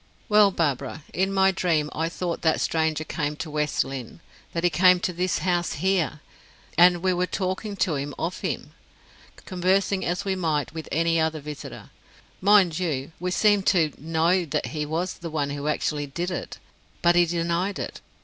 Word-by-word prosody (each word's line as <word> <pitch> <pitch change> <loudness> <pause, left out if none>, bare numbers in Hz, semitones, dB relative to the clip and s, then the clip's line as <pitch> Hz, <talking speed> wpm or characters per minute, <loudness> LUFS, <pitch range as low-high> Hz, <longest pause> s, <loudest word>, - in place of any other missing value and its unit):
Well, 210 -1 +6
Barbara, 145 -4 -2
in 190 +4 +1
my 190 0 +4
dream 165 -5 0
I 165 +1 -1
thought 175 -1 -3
that 160 -1 +2
stranger 160 -1 0
came 150 -1 -3
to 160 0 -6
West 150 0 0
Lynne, 135 +1 -7 0.3
that 170 - -3
he 175 - +3
came 180 +3 +5
to 180 0 -2
this 180 +1 0
house 175 -2 +1
here, 180 -5 0 0.5
and 175 0 +5
we 185 -1 +3
were 180 +1 0
talking 195 +3 -3
to 180 -4 +1
him 140 +1 -4
of 175 +2 -3
him, - - -4 0.7
conversing 190 +1 +1
as 175 +3 -2
we 195 -1 0
might 160 -5 -1
with 160 -2 -7
any 165 +2 +2
other 160 0 0
visitor. 150 0 -9 0.5
Mind 190 -4 +5
you, 150 -5 -2
we 180 +2 -2
seemed 205 +1 +3
to 160 -6 +3
know 165 +4 +2
that 155 - -2
he 150 -1 -2
was 170 +4 -2
the 170 - -6
one 145 -2 -1
who 145 +1 -4
actually 150 -1 -1
did 175 +6 -3
it; 175 - -5 0.5
but 175 0 +5
he 175 0 +5
denied 170 +3 -1
it. - - -6
170 Hz, 180 wpm, -25 LUFS, 155-185 Hz, 0.7 s, Well